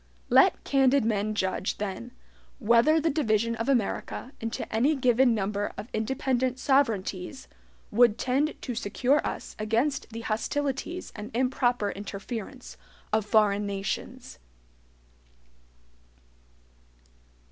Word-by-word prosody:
Let - - +5
candid 270 -2 +3
men 215 -1 0
judge, 190 -1 -1
then, 205 +3 -5 0.5
whether 235 +6 +4
the 320 +1 +1
division 230 -5 +1
of 230 +4 -2
America 245 0 -1
into 225 0 -3
any 265 +8 +3
given 250 -2 +3
number 205 0 -2
of 220 - -7
independent 255 +3 0
sovereignties 230 -5 0 0.4
would 235 0 +4
tend 275 +6 0
to 250 - -5
secure 250 +6 +1
us - - -5
against 230 +7 0
the 230 0 -7
hostilities 275 +9 -3
and 210 +1 -7
improper 245 -4 +1
interference 210 +5 -7 0.4
of 215 -1 +1
foreign 210 -2 +3
nations. 195 - -5
230 Hz, 105 wpm, -27 LUFS, 210-265 Hz, 0.5 s, Let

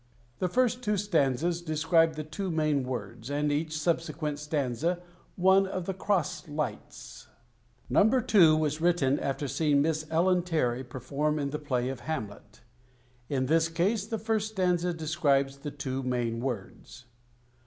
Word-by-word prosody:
The 185 - +1
first 245 +3 +1
two 210 -3 0
stanzas 170 -3 +1
describe 160 0 +2
the 155 - -4
two 160 +6 -4
main 155 -4 +1
words, 125 -1 -6
and 145 +1 0
each 155 +2 -1
subsequent 155 -2 -1
stanza 150 +3 -1 0.4
one 190 +1 +4
of 185 -2 -4
the 195 - -2
cross 185 -3 -1
"lights." 150 0 -6 0.6
No. - - +4 0.3
II. 170 -7 +8
was 155 0 0
written 165 -6 +2
after 140 +1 -2
seeing 145 0 +2
Miss 155 0 -1
Ellen 180 +3 +3
Terry 135 -8 0
perform 140 +4 -2
in 140 -2 -2
the 150 - -3
play 125 -4 -1
of 135 -2 -5
"Hamlet." 105 -7 -6 0.7
In 130 -2 0
this 160 +4 +3
case 195 +6 0
the 225 - -2
first 220 -1 -1
stanza 180 -2 +1
describes 150 -4 +1
the 145 +2 -6
two 135 -2 -4
main 120 -3 -1
words. 120 +1 -6
155 Hz, 150 wpm, -29 LUFS, 140-175 Hz, 0.7 s, II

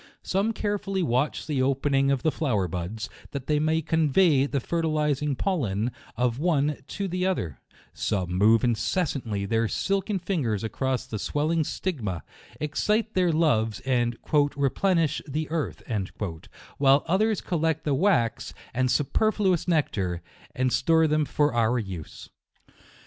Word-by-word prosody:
Some 200 +4 +1
carefully 205 -3 -2
watch 130 +2 0
the 145 -4 0
opening 135 +1 +2
of 135 -2 +1
the 155 - +3
flow 135 -6 0
er 95 -2 +1
buds, 90 +5 -4 0.3
that 140 -2 -4
they 150 -1 +1
may 160 +1 +1
convey 155 -2 +3
the 140 - -1
fertilizing 150 -2 0
pollen 125 - -1 0.3
of 125 0 0
one 150 -3 +1
to 200 -1 -3
the 180 +1 -1
other; 90 - -2 0.3
some 95 -4 -2
move 110 +5 +4
inces 125 - +1
santly 105 -7 -3
their 115 +2 +1
silken 195 - -1
fingers 150 - -1
across 130 +4 -1
the 110 -5 -5
swelling 155 +7 0
stigma, 115 - -3 0.4
excite 210 +9 0
their 180 -2 +3
loves, 115 -10 +2
and 120 -3 0 0.2
" 145 0 +3
replenish 155 +3 +1
the 150 +2 -2
earth," 160 -3 -3 1.0
while 140 0 +5
others 205 +4 +2
collect 160 -2 -1
the 145 - 0
wax, 135 - +1 0.2
and 130 +1 +1
su 145 - +3
perfluous 195 0 +1
nectar, 95 - 0 0.3
and 130 0 +1
store 160 +3 +4
them 155 -1 +2
for 145 0 +1
our 120 +1 +2
use. 95 -8 -6
145 Hz, 145 wpm, -26 LUFS, 120-165 Hz, 1.0 s, while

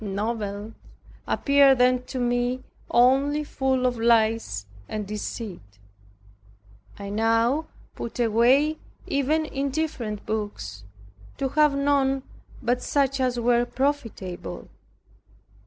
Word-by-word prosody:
Novels 205 +1 -3 0.5
appeared 280 -1 +4
then 250 0 +4
to 260 - -6
me 245 +1 0 0.3
only 275 +5 +3
full 265 -3 0
of 245 -2 0
lies 225 - +2 0.2
and 215 -1 -3
deceit. 200 - -6 1.2
I 200 0 -6
now 230 +8 +2 0.3
put 235 - -7
away 245 +7 +3 0.3
even 300 +3 +1
indifferent 275 -7 -3
books, 105 - -4 0.5
to 270 - -1
have 300 0 +3
none 275 -1 +2 0.4
but 245 +1 +1
such 275 -1 +1
as 250 -2 0
were 240 0 +3
profitable. 245 -9 -3
245 Hz, 100 wpm, -25 LUFS, 220-275 Hz, 1.2 s, appeared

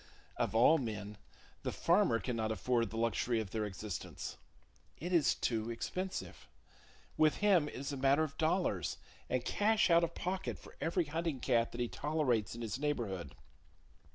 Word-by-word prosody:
Of - - -1
all 150 +8 +6
men, 105 -4 -5 0.4
the - - -2
farmer 115 - +3
cannot 115 -3 -2
afford 115 +1 +1
the 115 - -6
luxury 115 +1 +1
of 105 -4 -4
their 110 -1 -1
existence! 100 -1 -5 0.6
It 175 +4 -4
is 155 -7 +4
too 115 -1 -1
expensive. 185 +11 -4 0.7
With 155 -1 +4
him 190 -7 +4
it - - -8
is 140 +2 -4
a - - -3
matter 140 +3 +4
of 150 -2 -4
dollars, 160 - +1 0.3
and 125 -1 0
cash 215 -3 +3
out 170 0 +6
of 170 0 -1
pocket 185 +1 -3
for - - -15
every 170 +1 +1
hunting 160 -1 -2
cat 120 -3 +2
that 120 - -4
he 120 - +1
tolerates 130 -9 0
in 120 - -6
his 115 +3 -3
neighborhood. 100 - -2
125 Hz, 165 wpm, -34 LUFS, 115-160 Hz, 0.7 s, all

